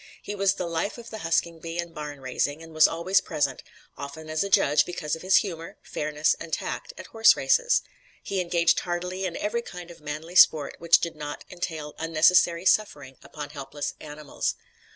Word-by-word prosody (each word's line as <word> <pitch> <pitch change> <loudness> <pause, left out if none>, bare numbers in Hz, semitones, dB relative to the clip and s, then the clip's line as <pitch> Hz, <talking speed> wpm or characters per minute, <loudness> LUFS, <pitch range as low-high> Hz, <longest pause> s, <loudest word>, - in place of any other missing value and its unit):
He - - -5
was 195 -1 +2
"the 180 - -3
life" 170 +6 -2
of 235 - -11
the 220 - -6
husking 165 -1 0
bee 165 +1 -6
and 170 -1 -4
barn 150 -2 -7
raising, 145 +4 -2
and 165 0 -12
was 155 0 +6
always 170 +4 +1
present, 140 -3 -1 0.3
often 155 +3 -8
as 155 +3 +1
a 200 - -4
judge 150 -5 +4
because 165 -4 -3
of 160 - -11
his 185 +1 +3
humor, 165 -5 0
fairness 150 0 0
and 165 - -8
tact, - - -4
at - - -9
horse 225 0 +5
races. - - +3 0.4
He 195 -2 -1
engaged 170 -1 +2
heartily 180 +2 -3
in 180 - -3
every 235 +3 -1
kind 180 -5 -9
of 170 - -15
"manly 155 +4 -6
sport" 155 -5 +5
which 170 0 +5
did 170 -1 -3
not 150 -1 -6
entail 160 -4 -5
unnecessary 170 +2 +3
suffering 145 -11 +1
upon 145 -2 -8
helpless 145 0 -5
animals. 150 -1 -4
165 Hz, 190 wpm, -26 LUFS, 150-180 Hz, 0.4 s, was